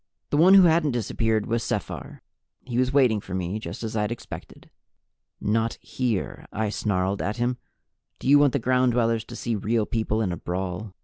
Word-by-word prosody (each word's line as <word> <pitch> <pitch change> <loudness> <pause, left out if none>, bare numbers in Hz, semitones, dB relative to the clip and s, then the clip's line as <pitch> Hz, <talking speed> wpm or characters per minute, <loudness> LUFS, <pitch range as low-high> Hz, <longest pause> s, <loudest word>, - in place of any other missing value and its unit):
The 145 - +2
one 180 +5 +7
who 195 - +9
hadn't 160 -4 +3
disappeared 110 -1 0
was 115 0 -1
Sephar. - - -4 0.4
He 125 -1 -2
was 130 0 +2
waiting 125 -7 +3
for 95 - -6
me, 95 +3 -2
just 110 - -7
as 110 0 -4
I'd 105 0 0
expected. 120 - -9 0.7
"Not 115 +2 0
here!" 120 -7 -3
I 110 0 -1
snarled 100 -2 -1
at 105 +3 -2
him. 120 +1 0 0.6
"Do - - -6
you 145 +1 +7
want 145 -3 +4
the - - +2
Ground 125 0 +2
Dwellers 115 -1 +1
to - - -9
see 120 -2 -2
Real 110 +2 0
People 110 -1 -1
in 105 -5 0
a 85 - -3
brawl?" 90 +3 -4
115 Hz, 190 wpm, -25 LUFS, 105-125 Hz, 0.7 s, who